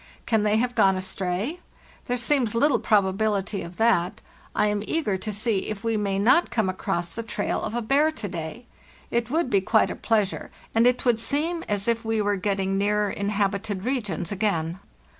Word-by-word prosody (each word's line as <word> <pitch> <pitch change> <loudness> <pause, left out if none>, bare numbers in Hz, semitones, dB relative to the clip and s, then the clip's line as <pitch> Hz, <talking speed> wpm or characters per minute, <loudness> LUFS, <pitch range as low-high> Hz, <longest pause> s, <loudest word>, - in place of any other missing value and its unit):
Can 220 -2 +2
they 210 +1 +2
have 245 +2 0
gone 195 -5 +4
astray? 190 - -2 0.5
There 245 - 0
seems 240 -2 +1
little 260 0 +3
probability 200 0 +1
of 170 +1 -9
that. 220 -6 +2 0.4
I - - +3
am 210 -1 0
eager 305 -12 0
to 215 - -4
see 210 -1 0
if 215 0 -5
we 230 -1 0
may 200 -2 0
not 250 - +4
come 220 -5 0
across 175 -2 -2
the 230 - -4
trail 215 -2 -2
of 225 - -4
a 240 - -1
bear 280 +7 +3
to 225 -9 -5
day. 175 +6 -6 0.5
It 235 0 0
would 315 -1 0
be 200 -2 +4
quite 220 +3 +3
a - - -4
pleasure, 210 -4 0 0.2
and 230 +2 +5
it 250 +1 +1
would 240 -2 +3
seem 315 +8 0
as 205 0 -1
if 230 0 +1
we 225 0 0
were 205 -1 +1
getting 195 0 -1
nearer 205 0 +1
inhabited 200 0 -1
regions 210 - -2
again. 185 -4 -1
210 Hz, 190 wpm, -25 LUFS, 195-235 Hz, 0.5 s, and